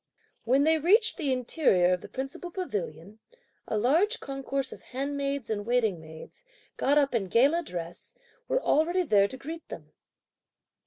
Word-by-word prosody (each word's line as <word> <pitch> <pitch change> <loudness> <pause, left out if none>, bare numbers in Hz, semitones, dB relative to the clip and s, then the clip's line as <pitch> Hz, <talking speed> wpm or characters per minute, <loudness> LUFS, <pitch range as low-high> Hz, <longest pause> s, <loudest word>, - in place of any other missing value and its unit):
When 265 +4 +3
they 320 +1 +3
reached 425 - +3
the 295 -7 -1
interior 240 - +2
of 180 - -2
the - - -9
principal 270 +6 -6
pavilion, 205 - -5 0.5
a 215 - -1
large 325 - +2
concourse 275 -1 -4
of - - -13
handmaids 280 0 -3
and 210 -2 -2
waiting 220 -6 +1
maids, 160 - -13 0.3
got 285 +2 +2
up 280 -2 +3
in 215 -5 0
gala 275 - +3
dress, 175 - -8 0.3
were - - +1
already 345 +5 +2
there 205 - +4
to 260 - -9
greet 320 +5 -8
them. - - -10
270 Hz, 155 wpm, -28 LUFS, 205-315 Hz, 0.5 s, there